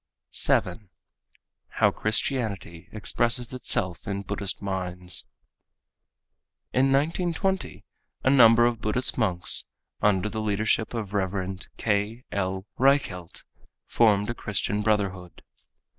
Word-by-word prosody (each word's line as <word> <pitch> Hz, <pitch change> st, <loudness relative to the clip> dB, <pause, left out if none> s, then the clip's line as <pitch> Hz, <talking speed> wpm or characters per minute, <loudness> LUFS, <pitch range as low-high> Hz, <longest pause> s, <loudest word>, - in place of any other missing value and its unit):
7. 105 Hz, -5 st, +1 dB, 0.8 s
How -, -, +3 dB
Christianity 105 Hz, -6 st, -2 dB
Expresses 120 Hz, +3 st, +1 dB
Itself 90 Hz, -9 st, -1 dB
in 100 Hz, -1 st, -3 dB
Buddhist 100 Hz, 0 st, -3 dB
Minds 90 Hz, -2 st, -3 dB, 1.4 s
In 130 Hz, +1 st, +3 dB
1920 165 Hz, -, -1 dB, 0.4 s
a -, -, +3 dB
number 120 Hz, -3 st, +7 dB
of 120 Hz, -2 st, 0 dB
Buddhist 125 Hz, +4 st, -1 dB
monks, 90 Hz, -6 st, +1 dB, 0.3 s
under 100 Hz, -1 st, +2 dB
the 110 Hz, +1 st, -4 dB
leadership 110 Hz, +2 st, 0 dB
of 105 Hz, -3 st, -5 dB
Rev. 95 Hz, -1 st, -2 dB, 0.2 s
K. 105 Hz, +3 st, -1 dB
L. 95 Hz, -1 st, -2 dB
Reichelt 130 Hz, -, +1 dB, 0.4 s
formed 105 Hz, -1 st, +2 dB
a -, -, -3 dB
Christian 105 Hz, -2 st, -1 dB
brotherhood. 100 Hz, -4 st, -2 dB
105 Hz, 100 wpm, -26 LUFS, 95-120 Hz, 1.4 s, number